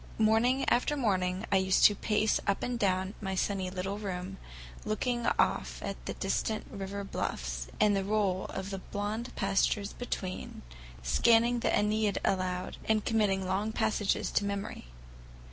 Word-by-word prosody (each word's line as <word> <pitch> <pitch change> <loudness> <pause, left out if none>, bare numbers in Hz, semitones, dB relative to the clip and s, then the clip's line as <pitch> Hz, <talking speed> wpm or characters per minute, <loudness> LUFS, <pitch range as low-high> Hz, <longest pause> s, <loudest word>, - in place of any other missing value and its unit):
Morning 225 +5 +3
after 295 +4 +2
morning 190 -5 0
I 195 - +5
used 190 0 +4
to 210 - +8
pace 210 +1 +1
up 200 - +1
and 245 -1 -2
down 190 -1 +1
my 190 -2 -2
sunny 190 -1 -1
little 190 +2 -3
room, 190 -1 -4 0.5
looking 240 +3 -1
off - - +1
at - - -5
the - - -3
distant 220 -2 -1
river 200 +1 -5
bluffs - - -3
and 210 -1 +4
the 195 - 0
roll 200 -2 0
of 190 +1 -5
the 195 - -3
blond 210 +5 -4
pastures 200 +1 +1
between, 190 -6 -5 0.4
scanning 230 - +4
the - - 0
Æneid 210 -1 +2
aloud 185 -1 -1
and 220 -1 +1
committing 205 -4 +2
long 195 +4 0
passages 220 -2 0
to - - +2
memory. 200 - -4
200 Hz, 150 wpm, -31 LUFS, 190-220 Hz, 0.5 s, to